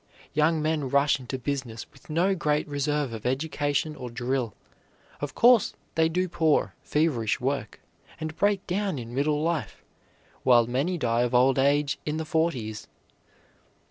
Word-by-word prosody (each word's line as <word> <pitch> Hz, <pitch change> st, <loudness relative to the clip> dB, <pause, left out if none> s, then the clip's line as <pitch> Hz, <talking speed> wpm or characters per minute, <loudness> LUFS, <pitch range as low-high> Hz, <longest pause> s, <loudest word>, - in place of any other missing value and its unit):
Young 155 Hz, +1 st, +2 dB
men 155 Hz, -3 st, 0 dB
rush 140 Hz, +1 st, +3 dB
into 130 Hz, +1 st, -5 dB
business 130 Hz, -3 st, -4 dB
with 180 Hz, -, -20 dB
no 175 Hz, +5 st, +2 dB
great 150 Hz, -4 st, 0 dB
reserve 145 Hz, -2 st, -1 dB
of 110 Hz, -, -7 dB
education 145 Hz, +2 st, -1 dB
or 125 Hz, -3 st, -7 dB
drill; 120 Hz, -1 st, -2 dB, 0.6 s
of 145 Hz, -2 st, -5 dB
course, 240 Hz, -3 st, +5 dB, 0.2 s
they 160 Hz, 0 st, +3 dB
do 180 Hz, +3 st, 0 dB
poor, 160 Hz, -3 st, +1 dB
feverish 140 Hz, -9 st, 0 dB
work, 130 Hz, -5 st, -3 dB, 0.4 s
and 155 Hz, 0 st, -5 dB
break 200 Hz, 0 st, +1 dB
down 195 Hz, -2 st, -1 dB
in 120 Hz, -1 st, -7 dB
middle 150 Hz, +3 st, +1 dB
life, 160 Hz, -10 st, -2 dB, 0.6 s
while 120 Hz, -2 st, +5 dB
many 140 Hz, +10 st, -1 dB
die 120 Hz, -5 st, +1 dB
of 120 Hz, 0 st, 0 dB
old 130 Hz, +2 st, +4 dB
age 140 Hz, +1 st, +2 dB
in 150 Hz, +1 st, -2 dB
the 160 Hz, -, -3 dB
forties. 135 Hz, -10 st, -1 dB
145 Hz, 150 wpm, -26 LUFS, 125-160 Hz, 0.6 s, course